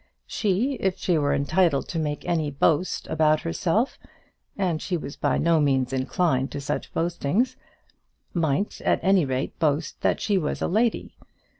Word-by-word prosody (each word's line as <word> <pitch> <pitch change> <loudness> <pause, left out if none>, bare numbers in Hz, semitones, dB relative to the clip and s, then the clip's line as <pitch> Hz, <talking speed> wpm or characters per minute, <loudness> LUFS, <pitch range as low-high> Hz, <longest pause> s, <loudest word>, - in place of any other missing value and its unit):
She, 225 +7 0
if 190 -1 0
she 175 -4 +1
were 145 -1 +1
entitled 155 +1 +2
to 165 - -2
make 150 -2 -3
any 160 -4 0
boast 150 +5 +1
about 155 -1 +2
herself 175 +8 0 0.6
and 180 -5 0
she 180 - -1
was 140 -3 -7
by - - 0
no 165 -1 +3
means 135 -3 +1
inclined 135 0 0
to - - -3
such 145 +1 -4
boastings 175 - 0 0.8
might 165 +2 -1
at - - +2
any 190 -4 +4
rate 130 0 -3
boast 155 -1 0
that - - +1
she 200 -3 +1
was 150 - -2
a - - 0
lady. 220 +5 0
165 Hz, 160 wpm, -25 LUFS, 145-185 Hz, 0.8 s, any